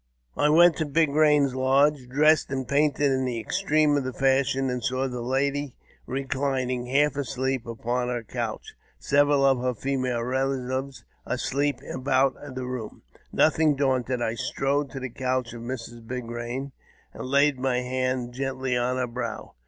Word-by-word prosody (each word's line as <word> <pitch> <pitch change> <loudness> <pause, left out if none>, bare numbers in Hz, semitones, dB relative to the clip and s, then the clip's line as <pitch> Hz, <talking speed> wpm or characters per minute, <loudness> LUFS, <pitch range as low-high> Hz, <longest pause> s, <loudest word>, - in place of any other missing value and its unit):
I 150 - +2
went 170 +2 +6
to 160 - 0
Big 155 +1 +2
Eain's 150 -2 +3
lodge, 135 +1 +2
dressed 150 +3 +3
and 130 -1 -3
painted 145 -1 +2
in 130 0 +1
the 120 -3 -3
■extreme 155 -6 +2
of 140 - +1
the 130 - -3
fashion, 135 0 +2
and 125 -2 -3
saw 130 +2 0
the 125 -2 -5
lady 140 +2 -1 0.3
reclining, 130 -2 -2
half 145 +3 +2
asleep, 130 -2 -2
upon 120 +2 -2
her 120 -1 -2
couch, - - -4
and - - -39 0.3
several 145 -1 +4
of 135 -2 +4
her 125 -1 -1
female 130 -1 -1
relatives 130 +1 -2 0.2
asleep 140 -1 -1
about 130 0 +1 0.2
the 130 -1 -4
room. 125 -4 -6 0.3
Nothing 155 -1 +3
daunted, 130 -3 0
I 115 - 0
strode 140 +4 -1
to 135 - -7
the 130 0 -5
couch 130 -1 -2
of 120 - -8
Mrs. 120 -1 -7
Big 125 0 -4
Hain, 120 +4 -5 0.4
and - - -7
laid 140 0 +3
my 125 -1 0
hand 130 -1 -2
gently 130 -1 -2
on 125 +1 0
her 130 - 0
brow. 120 -1 -5
130 Hz, 165 wpm, -26 LUFS, 125-140 Hz, 0.4 s, went